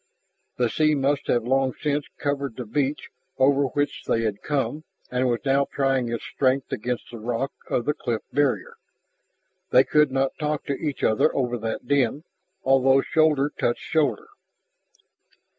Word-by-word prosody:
The 125 Hz, -, +2 dB
sea 155 Hz, +5 st, +2 dB
must 140 Hz, +1 st, 0 dB
have 120 Hz, -2 st, +2 dB
long 130 Hz, +1 st, +1 dB
since 145 Hz, -1 st, -1 dB
covered 140 Hz, -4 st, -2 dB
the 125 Hz, -, -6 dB
beach 140 Hz, +6 st, -2 dB, 0.3 s
over 140 Hz, +1 st, +4 dB
which 145 Hz, +2 st, -2 dB
they 115 Hz, -, +1 dB
had 105 Hz, -2 st, -2 dB
come 150 Hz, +1 st, -2 dB, 0.3 s
and 125 Hz, 0 st, +1 dB
was 120 Hz, -1 st, 0 dB
now 140 Hz, +1 st, +3 dB
trying 135 Hz, -3 st, +1 dB
its 115 Hz, -1 st, -3 dB
strength 130 Hz, 0 st, 0 dB
against 120 Hz, +2 st, -3 dB
the 120 Hz, -, -8 dB
rock 120 Hz, +4 st, -2 dB, 0.2 s
of 120 Hz, -, 0 dB
the 150 Hz, -, +1 dB
cliff 115 Hz, -5 st, -3 dB
barrier. 145 Hz, 0 st, 0 dB, 0.9 s
They 130 Hz, -, +6 dB
could 150 Hz, +1 st, +3 dB
not 135 Hz, 0 st, -1 dB
talk 150 Hz, -1 st, -2 dB
to 140 Hz, -, -1 dB
each 145 Hz, 0 st, -4 dB
other 110 Hz, +7 st, +3 dB
over 125 Hz, -3 st, 0 dB
that 115 Hz, +2 st, -4 dB
din, 140 Hz, +1 st, +1 dB, 0.4 s
although 135 Hz, 0 st, +4 dB
shoulder 150 Hz, -3 st, +2 dB
touched 120 Hz, -, -1 dB
shoulder. 170 Hz, -, 0 dB
135 Hz, 160 wpm, -24 LUFS, 125-145 Hz, 0.9 s, They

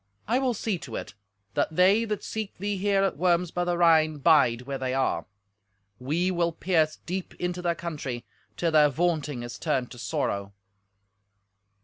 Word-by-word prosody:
I 240 Hz, +4 st, +2 dB
will 255 Hz, -3 st, 0 dB
see 210 Hz, -4 st, -2 dB
to 120 Hz, -7 st, -8 dB
it, -, -, -6 dB, 0.4 s
that 160 Hz, -, 0 dB
they 195 Hz, +6 st, +5 dB
that 210 Hz, -3 st, -3 dB
seek 220 Hz, -2 st, -5 dB
thee 205 Hz, +2 st, -2 dB
here 195 Hz, 0 st, +2 dB
at 195 Hz, -, 0 dB
Worms 175 Hz, 0 st, +2 dB
by 175 Hz, -, -1 dB
the 175 Hz, 0 st, 0 dB
Rhine 160 Hz, -3 st, +4 dB
bide 135 Hz, -6 st, +4 dB
where 135 Hz, +1 st, -4 dB
they 130 Hz, 0 st, -1 dB
are; 135 Hz, -1 st, 0 dB, 0.7 s
we 165 Hz, +8 st, 0 dB
will 170 Hz, -1 st, +1 dB
pierce 160 Hz, -2 st, +1 dB
deep 185 Hz, +1 st, -4 dB
into 180 Hz, 0 st, -3 dB
their 170 Hz, -1 st, 0 dB
country, 140 Hz, -9 st, -5 dB, 0.3 s
till 170 Hz, -1 st, +1 dB
their 150 Hz, -1 st, +6 dB
vaunting 150 Hz, -4 st, -1 dB
is 120 Hz, -, -7 dB
turned 135 Hz, -6 st, -1 dB
to 120 Hz, -, -10 dB
sorrow." 100 Hz, -9 st, -2 dB
170 Hz, 170 wpm, -27 LUFS, 140-180 Hz, 0.7 s, their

